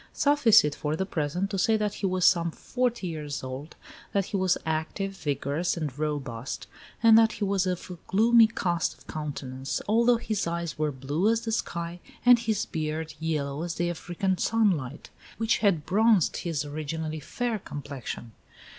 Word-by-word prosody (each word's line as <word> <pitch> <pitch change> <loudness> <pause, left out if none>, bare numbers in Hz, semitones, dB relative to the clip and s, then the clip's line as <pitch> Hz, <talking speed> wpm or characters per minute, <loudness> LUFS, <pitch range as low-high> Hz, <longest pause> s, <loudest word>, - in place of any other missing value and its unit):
Suffice 285 -6 +5
it 150 -1 0
for 150 +1 -2
the 190 - -1
present 180 +3 -2
to 195 - -1
say 220 +4 +3
that 210 -1 -1
he 200 - -2
was 185 -1 +1
some 170 -2 +4
forty 240 +4 -2
years 150 -5 -4
old, 130 +4 -7 0.4
that 200 -2 +2
he - - -5
was 185 -2 +2
active, 160 +5 -2
vigorous, 145 +2 -1
and 150 -6 -3
robust, 135 -5 -4 0.4
and 225 -1 +8
that 225 -1 +4
he - - -4
was 195 -1 +1
of 180 -1 -3
a 180 -2 -9
gloomy 225 +3 +6
cast 175 -6 -1
of - - -21
countenance, 135 -3 -4
although 235 +3 +4
his 215 -5 -2
eyes 170 -2 -3
were 155 -1 0
blue 145 +9 0
as 230 0 +2
the 230 -1 -3
sky, 170 -5 -3 0.3
and 245 -1 +8
his 220 -3 -1
beard 155 0 -3
yellow 150 -3 -2
as 170 -1 -3
the 175 0 0
African 180 +2 -2
sunlight, 180 - 0 0.3
which 225 0 +1
had 190 -8 +2
bronzed 215 -2 +3
his 155 -4 -2
originally 155 +1 -4
fair 235 +6 -2
complexion. 140 - -7
170 Hz, 170 wpm, -27 LUFS, 150-210 Hz, 0.4 s, and